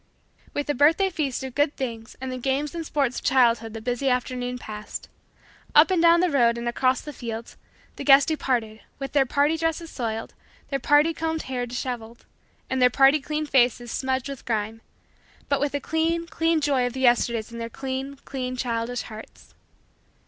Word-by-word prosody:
With 290 Hz, -, -1 dB
the 290 Hz, -, 0 dB
birthday 325 Hz, +8 st, +4 dB
feast 285 Hz, -7 st, -2 dB
of 260 Hz, -2 st, -6 dB
good 290 Hz, +2 st, +1 dB
things 230 Hz, -4 st, -5 dB
and 260 Hz, 0 st, -5 dB
the 255 Hz, -, -4 dB
games 275 Hz, +3 st, -1 dB
and 335 Hz, -1 st, -4 dB
sports 275 Hz, -5 st, -1 dB
of -, -, -18 dB
childhood 230 Hz, -4 st, +3 dB
the 225 Hz, -, -6 dB
busy 245 Hz, +3 st, -1 dB
afternoon 250 Hz, 0 st, -1 dB
passed. 215 Hz, -3 st, -8 dB, 0.7 s
Up 305 Hz, +5 st, +7 dB
and 360 Hz, -3 st, +3 dB
down 340 Hz, 0 st, +6 dB
the 365 Hz, -2 st, +2 dB
road 235 Hz, -4 st, +3 dB
and 235 Hz, 0 st, -4 dB
across 255 Hz, +1 st, +1 dB
the 295 Hz, -, -8 dB
fields, 230 Hz, -2 st, -6 dB, 0.4 s
the -, -, -5 dB
guests 275 Hz, 0 st, +7 dB
departed, 245 Hz, -8 st, -1 dB, 0.2 s
with 275 Hz, -1 st, -5 dB
their 275 Hz, -2 st, +3 dB
party 290 Hz, +4 st, +2 dB
dresses 325 Hz, 0 st, -2 dB
soiled, 225 Hz, -3 st, -4 dB, 0.4 s
their 275 Hz, -, 0 dB
party 295 Hz, +5 st, +4 dB
combed 320 Hz, 0 st, -2 dB
hair 250 Hz, -2 st, -3 dB
disheveled, 240 Hz, -1 st, -5 dB, 0.4 s
and 260 Hz, 0 st, -1 dB
their 250 Hz, -, +7 dB
party 270 Hz, +4 st, +5 dB
cleaned 305 Hz, +1 st, -3 dB
faces 240 Hz, -2 st, +3 dB
smudged 260 Hz, 0 st, -1 dB
with 275 Hz, -2 st, -7 dB
grime; 220 Hz, -1 st, -2 dB, 0.7 s
but 280 Hz, -, +2 dB
with 285 Hz, 0 st, -1 dB
the 285 Hz, -, 0 dB
clean, 330 Hz, +3 st, 0 dB
clean, 330 Hz, -1 st, +1 dB
joy 275 Hz, -4 st, +2 dB
of 245 Hz, -, -5 dB
the 260 Hz, -, -5 dB
Yesterdays 235 Hz, -2 st, +2 dB
in 235 Hz, -, -7 dB
their 230 Hz, 0 st, -4 dB
clean, 270 Hz, +2 st, -5 dB
clean, 255 Hz, -2 st, -4 dB
childish 240 Hz, 0 st, -2 dB
hearts. 220 Hz, -1 st, -12 dB
260 Hz, 185 wpm, -25 LUFS, 240-290 Hz, 0.7 s, Up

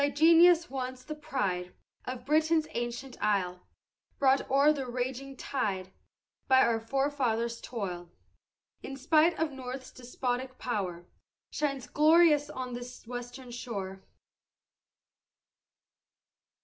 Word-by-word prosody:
Thy 285 Hz, -, +3 dB
genius, 335 Hz, +3 st, +6 dB
once 255 Hz, -1 st, -5 dB
the 305 Hz, -, -6 dB
pride 205 Hz, -13 st, -3 dB, 0.3 s
Of 255 Hz, -1 st, -6 dB
Britain's 315 Hz, +2 st, +3 dB
ancient 240 Hz, +2 st, -5 dB
isle, 180 Hz, -3 st, 0 dB, 0.6 s
Brought 270 Hz, -1 st, +3 dB
o'er 280 Hz, +3 st, +5 dB
the 270 Hz, -3 st, -4 dB
raging 260 Hz, +2 st, -4 dB
tide 190 Hz, -10 st, -2 dB, 0.6 s
By 260 Hz, -1 st, +6 dB
our 230 Hz, -1 st, +1 dB
forefathers' 235 Hz, -2 st, -1 dB
toil; 180 Hz, -7 st, -5 dB, 0.7 s
In 270 Hz, -, -7 dB
spite 315 Hz, +5 st, +3 dB
of 320 Hz, -1 st, 0 dB
North's 260 Hz, 0 st, -7 dB
despotic 255 Hz, +1 st, -4 dB
power, 185 Hz, -8 st, -3 dB, 0.5 s
Shines 275 Hz, -4 st, -2 dB
glorious 305 Hz, -1 st, +5 dB
on 255 Hz, -4 st, -5 dB
this 245 Hz, 0 st, -8 dB
western 245 Hz, +1 st, -7 dB
shore. 200 Hz, -6 st, -5 dB
255 Hz, 110 wpm, -30 LUFS, 235-285 Hz, 0.7 s, genius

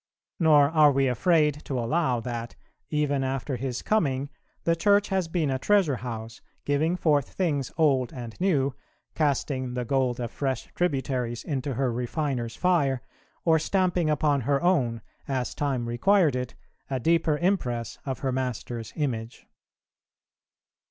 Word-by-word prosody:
Nor 150 Hz, -4 st, +5 dB
are 155 Hz, -2 st, +6 dB
we 135 Hz, 0 st, +2 dB
afraid 150 Hz, +2 st, +2 dB
to 135 Hz, -, -3 dB
allow, 125 Hz, +1 st, +1 dB
that, 120 Hz, -1 st, -5 dB, 0.3 s
even 145 Hz, -3 st, 0 dB
after 135 Hz, +1 st, -2 dB
His 125 Hz, 0 st, -4 dB
coming, 140 Hz, -9 st, 0 dB, 0.3 s
the 165 Hz, -, +2 dB
Church 205 Hz, +4 st, +3 dB
has 190 Hz, -3 st, 0 dB
been 160 Hz, -4 st, 0 dB
a 130 Hz, -, -1 dB
treasure 185 Hz, -7 st, +3 dB
house, 115 Hz, -1 st, -7 dB, 0.2 s
giving 155 Hz, +4 st, +1 dB
forth 150 Hz, -6 st, +2 dB
things 145 Hz, -8 st, -1 dB
old 135 Hz, -6 st, +2 dB
and 120 Hz, -6 st, -7 dB
new, 140 Hz, -8 st, +2 dB, 0.4 s
casting 135 Hz, -4 st, -1 dB
the 125 Hz, -1 st, -2 dB
gold 130 Hz, -1 st, 0 dB
of 120 Hz, -1 st, -3 dB
fresh 135 Hz, -4 st, -2 dB
tributaries 130 Hz, -8 st, -1 dB
into 135 Hz, -3 st, -3 dB
her 130 Hz, 0 st, 0 dB
refiner's 125 Hz, -1 st, -2 dB
fire, 140 Hz, -8 st, +1 dB, 0.4 s
or 160 Hz, -1 st, +5 dB
stamping 180 Hz, -1 st, +1 dB
upon 150 Hz, -2 st, +2 dB
her 140 Hz, +3 st, +1 dB
own, 130 Hz, -11 st, +2 dB, 0.3 s
as 130 Hz, -3 st, -2 dB
time 135 Hz, -5 st, -1 dB
required 160 Hz, +5 st, +3 dB
it, 125 Hz, -1 st, -4 dB, 0.3 s
a 135 Hz, -1 st, -1 dB
deeper 160 Hz, +2 st, +2 dB
impress 130 Hz, -, -1 dB
of 135 Hz, -2 st, -3 dB
her 135 Hz, -, 0 dB
Master's 125 Hz, -2 st, -3 dB
image. 120 Hz, -6 st, -3 dB
140 Hz, 145 wpm, -26 LUFS, 125-160 Hz, 0.4 s, are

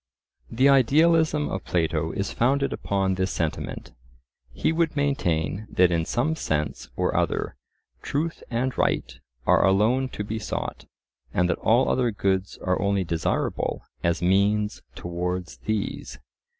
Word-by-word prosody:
The 130 Hz, +4 st, +3 dB
idealism 150 Hz, +3 st, +4 dB
of 95 Hz, -, -4 dB
Plato 80 Hz, -1 st, 0 dB
is 100 Hz, -, -3 dB
founded 140 Hz, +3 st, +1 dB
upon 95 Hz, -1 st, 0 dB
this 95 Hz, +1 st, -1 dB
sentiment. 80 Hz, -2 st, -3 dB, 0.6 s
He 65 Hz, -, 0 dB
would 165 Hz, -1 st, 0 dB
maintain 110 Hz, -, 0 dB
that 90 Hz, -1 st, +3 dB
in 85 Hz, -1 st, +1 dB
some 135 Hz, -, 0 dB
sense 75 Hz, -, -2 dB
or -, -, 0 dB
other -, -, 0 dB, 0.5 s
truth 160 Hz, +4 st, -2 dB
and 125 Hz, +2 st, -1 dB
right -, -, 0 dB, 0.3 s
are -, -, +4 dB
alone 110 Hz, +7 st, +3 dB
to 105 Hz, -, -3 dB
be 110 Hz, +2 st, -4 dB
sought, -, -, -4 dB, 0.5 s
and 90 Hz, 0 st, +3 dB
that -, -, -2 dB
all 120 Hz, +4 st, +3 dB
other 125 Hz, -2 st, +2 dB
goods 95 Hz, -2 st, -1 dB
are 90 Hz, 0 st, 0 dB
only 100 Hz, -1 st, +1 dB
desirable 85 Hz, -2 st, -1 dB, 0.2 s
as 85 Hz, 0 st, 0 dB
means 100 Hz, +3 st, +2 dB
towards 90 Hz, -4 st, -4 dB
these. 105 Hz, -, -3 dB
100 Hz, 135 wpm, -25 LUFS, 90-130 Hz, 0.6 s, idealism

